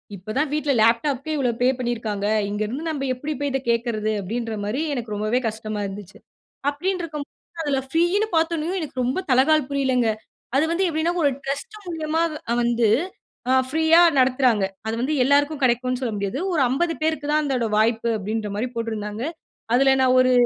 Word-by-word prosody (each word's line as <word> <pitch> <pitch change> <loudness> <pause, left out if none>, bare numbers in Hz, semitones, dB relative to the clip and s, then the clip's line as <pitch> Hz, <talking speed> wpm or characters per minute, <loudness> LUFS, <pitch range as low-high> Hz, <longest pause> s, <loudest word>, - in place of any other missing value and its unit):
"இப்ப 195 +3 -7
தான் 295 +1 +1
வீட்ல 300 -2 +1
லேப்டாப்க்கே 260 +6 +2
இவ்வளோ 255 -4 +1
பே 250 - +4
பண்ணியிருக்காங்க. 225 -4 -2 0.2
இங்க 205 +1 -3
இருந்து 270 +9 -5
நம்ப 285 -3 -3
எப்பிடி 295 +5 -4
போய் 285 -1 0
இத 270 - 0
கேட்கிறது?" 230 -2 0
அப்பிடின்றமாரி 220 +3 -3
எனக்கு 235 -5 -4
ரொம்பவே 215 +4 0
கஷ்டமா 215 -1 -5
இருந்துச்சு. 195 -1 -9 0.5
அப்பிடின்டிருக்கும்போது 330 -1 -5
அதில 285 -3 0
ப்ரீன்னு 345 +7 +2
பார்த்தவுடனயே 330 +2 0
எனக்கு 290 -4 -6
ரொம்ப 255 +8 0
தலகால் 290 +5 +5
புரியலங்க. 260 -4 +1 0.5
அது 275 - +4
வந்து 365 +3 +1
எப்பிடின்னா, 325 +1 0
ஒரு 285 - +5
டிரஸ்ட் 285 - -4
மூலியமா 320 -1 -1 0.3
அ - - +3
வந்து 235 -1 +2 0.6
அ - - +5 0.2
ப்ரீயா 320 +2 +5 0.2
நடத்துறாங்க. 255 -5 +3 0.2
அது 220 - -1
வந்து 275 +5 0
எல்லாருக்கும் 285 +2 +2
கிடைக்கும்னு 250 0 +1
சொல்ல 240 -4 -2
முடியாது. 200 +5 -2
ஒரு 310 - +2
50 330 +6 +1
பேருக்கு 310 -2 -1
தான், 305 0 +3
அதோட 260 -5 0
வாய்ப்பு, 225 +1 +2
அப்பிடின்றமாரி 210 +2 -3
போட்டிருந்தாங்க. 220 -1 -3 0.5
அதில 270 +1 +5
நான் 255 -1 +4
ஒரு 255 0 +4
255 Hz, 160 wpm, -23 LUFS, 225-305 Hz, 0.6 s, தலகால்